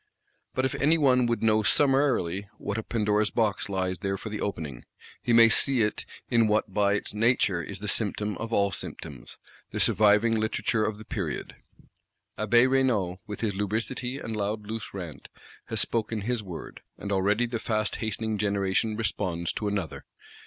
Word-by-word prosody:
But 130 - +1
if 130 - -1
any 155 +4 +5
one 125 -5 +4
would 115 -1 -1
know 110 -1 +4
summarily 115 - +2
what 105 +2 -3
a - - -2
Pandora's 105 -2 +1
Box 110 -4 0
lies 95 -2 -1
there 95 -1 -2
for 110 - -7
the 105 -1 -5
opening, 80 -11 -4 0.4
he 120 - -1
may 115 0 +8
see 125 +1 +3
it 105 - -2 0.2
in 115 -2 +3
what 105 0 +1
by 100 -1 +3
its 100 - -4
nature 105 -5 +2
is - - -7
the - - -6
symptom 105 -1 -1
of 115 0 -5
all 100 -3 +2
symptoms, - - -7 0.3
the - - -4
surviving 105 +2 +4
Literature 110 0 0
of 105 -1 -1
the 110 - -11
Period. - - -4 0.8
Abbé 120 +4 +4
Raynal, 120 -9 +1
with 105 - -6
his 110 -3 0
lubricity 115 +6 -2
and 115 -5 -5
loud 105 +1 -2
loose 110 +1 -5
rant, 85 -6 -8 0.4
has - - +1
spoken 110 -1 -1
his 120 +2 -1
word; 90 -5 -8 0.2
and 100 - -5
already 100 +4 +2
the 120 -1 -3
fast 110 -2 -1
hastening 110 -1 -2
generation 100 +1 0
responds 90 -6 -1
to 105 - -3
another. 100 -6 -3
105 Hz, 175 wpm, -27 LUFS, 100-115 Hz, 0.8 s, may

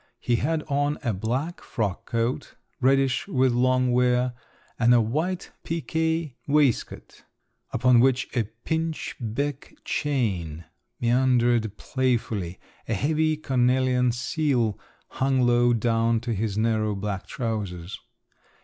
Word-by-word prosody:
He 120 -1 +1
had 155 +4 0
on 145 0 0
a 115 - 0
black 125 - -3
frock 105 -6 -3
coat, 115 +1 -2 0.2
reddish 135 +3 +2
with 130 -9 +2
long 130 +1 +2
wear, 125 0 +2 0.5
and 120 +1 +5
a - - +6
white 155 +11 -1
piqué 160 -2 -1
waistcoat, 145 -4 0 0.5
upon 125 -2 +4
which 130 +1 +3
a 120 -3 +1 0.2
pinchbeck 145 -4 -3
chain 95 - -1 0.3
meandered 120 -3 +2
playfully; 115 -9 -1 0.3
a - - 0
heavy 155 +1 +1
cornelian 125 -2 +2
seal 120 -3 0 0.3
hung 130 -1 +1
low 120 0 +4
down 115 0 +2
on - - +1
to 120 0 -2
his 105 -1 -2
narrow 110 -1 +1
black 100 -1 -4
trousers. 100 -7 -4
125 Hz, 115 wpm, -25 LUFS, 115-135 Hz, 0.5 s, a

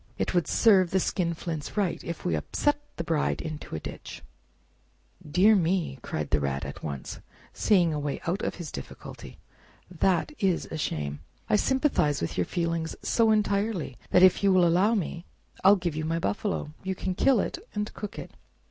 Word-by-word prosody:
It - - -1
would 175 -2 +2
serve 195 -6 +5
the 190 - +2
skinflints 170 -2 -2
right 195 -4 0
if 170 -1 -6
we 85 - +1
upset 290 - 0 0.2
the 170 - -3
Bride 160 -2 0
into 155 - -6
a - - -3
ditch!" - - -8 1.0
"Dear 185 +8 +4
me!" 170 -6 0
cried 75 -9 -4
the 75 - +3
Rat 70 -1 -2
at - - -7
once, 70 -3 -6 0.3
seeing 175 -6 +3
a 150 - -2
way 145 -1 -3
out 180 +5 -1
of - - -2
his 170 -5 -7
difficulty, - - -9 0.5
"that 180 - +1
is 190 -5 +1
a 160 - -3
shame! 75 - -3 0.3
I - - +6
sympathize 260 - +2
with 85 - -3
your 90 - +1
feelings 170 -2 -2
so 230 -1 +3
entirely 205 - 0
that 180 - +5
if 185 - +6
you 200 - +5
will 185 -2 +5
allow 190 +7 +3
me, 170 -3 -3 0.4
I'll 195 +2 +8
give 175 -5 -3
you 155 - -2
my 165 +1 -1
buffalo. 190 -3 -2
You 190 0 -3
can 185 0 -2
kill 255 +5 +3
it, 340 - -2 0.2
and 210 0 -2
cook 210 - -7
it." - - -7
175 Hz, 185 wpm, -27 LUFS, 155-200 Hz, 1.0 s, I'll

